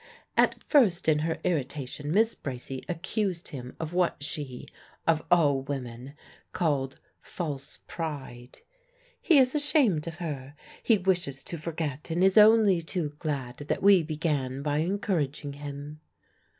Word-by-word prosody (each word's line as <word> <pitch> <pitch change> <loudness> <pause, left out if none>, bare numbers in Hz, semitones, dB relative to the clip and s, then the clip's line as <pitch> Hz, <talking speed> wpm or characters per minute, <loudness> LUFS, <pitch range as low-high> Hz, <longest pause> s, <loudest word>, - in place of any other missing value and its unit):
At - - +2
first 200 - +3
in 155 -1 +4
her 160 +1 -1
irritation 145 -2 -2
Miss 220 +5 +3
Bracy 130 -1 -6
accused 180 +1 -2
him 125 -3 -8
of 160 +1 -4
what 175 -5 +1
she 145 -4 -5 0.4
(of 160 -1 +2
all 145 -6 +4
women!) 130 -1 -6 0.4
called 140 -5 0 0.2
false 145 -5 -5
pride. 135 -7 -6 0.6
"He 330 - +5
is 260 -1 +5
ashamed 280 - +2
of 165 -1 -6
her. 145 -5 -5 0.3
He 225 - +4
wishes 175 -8 0
to 170 - -5
forget, 155 -3 -4
and 170 +3 +1
is 190 0 +4
only 210 -4 +6
too 165 -2 -2
glad 135 -6 -3
that 145 +5 -3
we 200 -2 +7
began 150 -4 -2
by 145 0 0
encouraging 160 - -1
him." 145 +1 -8
155 Hz, 135 wpm, -28 LUFS, 140-180 Hz, 0.6 s, we